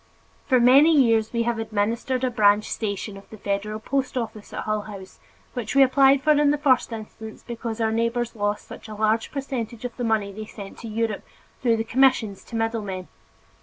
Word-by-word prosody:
For 255 -3 +4
many 280 +6 +6
years 225 -4 +3
we 235 -1 0
have 235 -1 -1
administered 225 +4 -1
a 255 - +1
branch 210 -2 +3
station 205 -1 -3
of 195 - -15
the 220 - -11
federal 205 +2 -3
post 260 +3 -2
office 225 -3 -5
at - - -4
Hull 215 -1 -1
House, 195 -2 -10 0.3
which 240 -1 -4
we 275 - +8
applied 270 +1 +4
for 310 - +4
in 295 -1 +4
the 295 - +2
first 265 -4 +2
instance 220 0 -9
because 230 -1 -5
our 220 -1 +1
neighbors 230 +1 -1
lost 205 0 -2
such - - -10
a 215 - -8
large 220 +1 0
percentage 250 -4 -4
of 245 - -5
the 245 - -3
money 220 -3 0
they 215 +2 -7
sent 200 -2 -10
to 230 - -8
Europe, 220 -1 -2 0.4
through 235 -3 +2
the 225 - -1
commissions 230 -4 +2
to 235 - -9
middle 225 0 -1
men. 185 -3 -6
225 Hz, 205 wpm, -24 LUFS, 215-250 Hz, 0.4 s, we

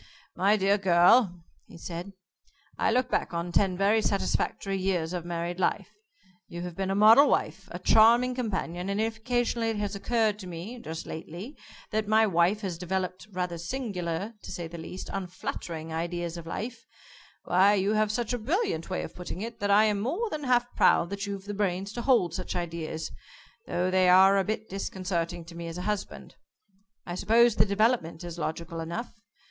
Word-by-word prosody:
"My 200 +3 +3
dear 200 +1 +2
girl," 180 0 +4 0.2
he - - -13
said, 175 +3 -7 0.6
"I - - +1
look 250 +1 +1
back - - -1
on 170 +1 -2
ten 185 0 +2
very 205 +3 +3
satisfactory 195 -1 -1
years 180 -3 -1
of 175 -2 -4
married 175 +1 -3
life. - - 0 0.6
You 175 0 -6
have 175 -2 -6
been 190 +1 -2
a 195 - 0
model 220 +7 +7
wife, - - -1
a - - -6
charming 235 +3 +5
companion 190 -7 -3
and 200 +1 -1
if 220 0 -1
occasionally 235 0 0
it 225 - -1
has 205 -1 -2
occurred 215 0 0
to 190 - -8
me 180 +8 -7
just 160 -7 -6
lately 175 - -7 0.4
that 215 -1 -1
my 220 +1 +5
wife 185 +2 +2
has 180 -5 -4
developed 185 +2 -3
rather 180 -2 -3
singular, 190 -2 -3
to - - -9
say 170 -2 -5
the 170 +1 -9
least, 180 +3 -7
unflattering 170 -3 -5
ideas 170 +1 -3
of 170 -1 -8
life, 230 +6 -5 0.6
why, 195 +3 +4
you 200 +2 +1
have 215 -1 +2
such 235 +1 -2
a 245 - -1
brilliant 255 - -1
way 185 - -2
of - - -8
putting 180 +1 -7
it, 230 0 -7
that 205 - -1
I 205 +2 +6
am 210 -2 +2
more 350 - -2
than 300 -2 -4
half 245 -1 +3
proud 170 - +4
that 200 +1 -4
you've 200 -1 -5
the 205 - -5
brains 195 0 -1
to 240 - -4
hold 230 - +3
such 185 +1 -4
ideas, 165 -2 -4 0.6
though 180 +1 0
they 185 -1 +4
are 190 +2 +7
a - - +2
bit 215 +2 -3
disconcerting 180 -3 -3
to 170 0 -12
me 170 0 -6
as 165 +1 -6
a 180 - -4
husband. 210 0 -4 0.7
I 175 - -5
suppose 225 +5 +4
the - - +5
development 200 -5 +1
is 175 -1 -7
logical 165 +1 -4
enough. 170 +9 -5
195 Hz, 190 wpm, -28 LUFS, 175-220 Hz, 0.7 s, model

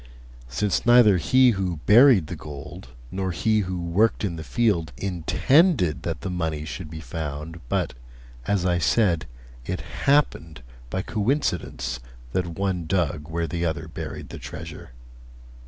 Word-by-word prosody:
Since 95 +11 0
neither 120 -5 +6
he 130 +8 +5
who 95 -5 -2
buried 115 - +7
the 85 - -6
gold 75 -4 -9 0.2
nor 95 0 -2
he 110 +5 +1
who 95 -3 -2
worked 90 +7 +1
in 95 -5 -1
the 80 - -6
field 100 -8 +1
intended 95 - +2
that 80 -3 -4
the 95 - -4
money 80 -4 -2
should 80 0 -6
be 80 0 -7
found, 80 +3 -6
but, - - 0 0.5
as 100 -3 +1
I 90 -1 +2
said, 85 - +2 0.4
it - - -4 0.2
happened 110 - +2 0.3
by 95 +8 -2
coincidence 90 - -1 0.3
that 90 +4 -1
one 95 -4 -1
dug 80 -4 -1
where 85 +1 -1
the 85 +1 -3
other 80 -1 -2
buried 80 - -7
the - - -8
treasure. - - -8
90 Hz, 145 wpm, -24 LUFS, 80-105 Hz, 0.5 s, buried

